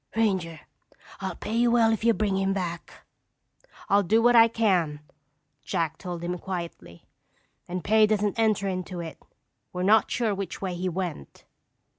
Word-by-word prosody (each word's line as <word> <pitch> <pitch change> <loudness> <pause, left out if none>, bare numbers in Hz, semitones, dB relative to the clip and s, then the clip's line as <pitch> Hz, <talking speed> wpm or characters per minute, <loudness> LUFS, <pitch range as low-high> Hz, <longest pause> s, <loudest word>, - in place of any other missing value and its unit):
Ranger, 185 -8 0 0.6
I'll - - -4
pay 215 - -6
you 240 +1 +3
well 230 -1 +4
if 220 - -3
you 230 -1 +4
bring 205 -2 0
him 195 0 +1
back." 175 -3 -6 0.8
"I'll 200 +1 +4
do 210 +4 +2
what 240 +1 +4
I 230 0 +8
can," 185 -10 0 0.6
Jack 160 +1 -2
told 175 -2 -6
him 175 +1 -3
quietly, 170 - -7 0.6
"and 180 -1 -4
pay 215 +3 +4
doesn't 210 0 0
enter 215 -3 +2
into 185 -1 -4
it. 165 -2 -7 0.5
We're 180 0 -3
not 215 +3 +4
sure 230 -4 0
which 195 -3 -5
way 190 -2 -3
he 180 +1 -2
went." 175 - -6
190 Hz, 160 wpm, -26 LUFS, 175-220 Hz, 0.8 s, I